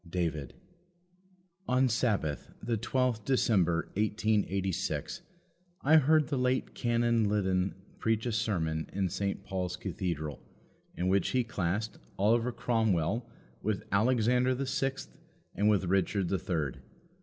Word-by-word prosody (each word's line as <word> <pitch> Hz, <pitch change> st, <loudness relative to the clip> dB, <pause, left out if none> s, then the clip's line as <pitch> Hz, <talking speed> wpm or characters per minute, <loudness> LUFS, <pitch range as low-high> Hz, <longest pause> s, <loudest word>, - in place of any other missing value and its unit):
David. 80 Hz, -6 st, -2 dB, 1.1 s
On 130 Hz, +1 st, +3 dB
Sabbath, 105 Hz, -, 0 dB
the 120 Hz, -, -1 dB
12th 120 Hz, 0 st, 0 dB
December 95 Hz, -10 st, +2 dB
1886, 105 Hz, -3 st, -1 dB, 0.6 s
I 155 Hz, +3 st, +6 dB
heard 155 Hz, +1 st, +4 dB
the 135 Hz, 0 st, -1 dB
late 125 Hz, +1 st, 0 dB
Canon 115 Hz, -2 st, +2 dB
Liddon 95 Hz, -2 st, +1 dB, 0.2 s
preach 110 Hz, 0 st, 0 dB
a 120 Hz, -, 0 dB
sermon 85 Hz, -8 st, -1 dB
in 95 Hz, -1 st, 0 dB
St. 100 Hz, +2 st, -2 dB
Paul's 90 Hz, -2 st, -3 dB
Cathedral, 85 Hz, -5 st, -4 dB, 0.6 s
in 90 Hz, -, 0 dB
which 95 Hz, 0 st, +2 dB
he 130 Hz, -1 st, +2 dB
classed 105 Hz, -1 st, -2 dB, 0.2 s
Oliver 115 Hz, +5 st, +3 dB
Cromwell 110 Hz, -3 st, 0 dB, 0.3 s
with 110 Hz, -2 st, -1 dB
Alexander 125 Hz, +4 st, +3 dB
the 135 Hz, +2 st, -2 dB
Sixth 135 Hz, +1 st, -2 dB, 0.4 s
and 105 Hz, +1 st, +2 dB
with 100 Hz, -3 st, +3 dB
Richard 95 Hz, 0 st, +1 dB
the 95 Hz, -, 0 dB
Third. 80 Hz, -8 st, -2 dB
105 Hz, 120 wpm, -30 LUFS, 90-120 Hz, 1.1 s, I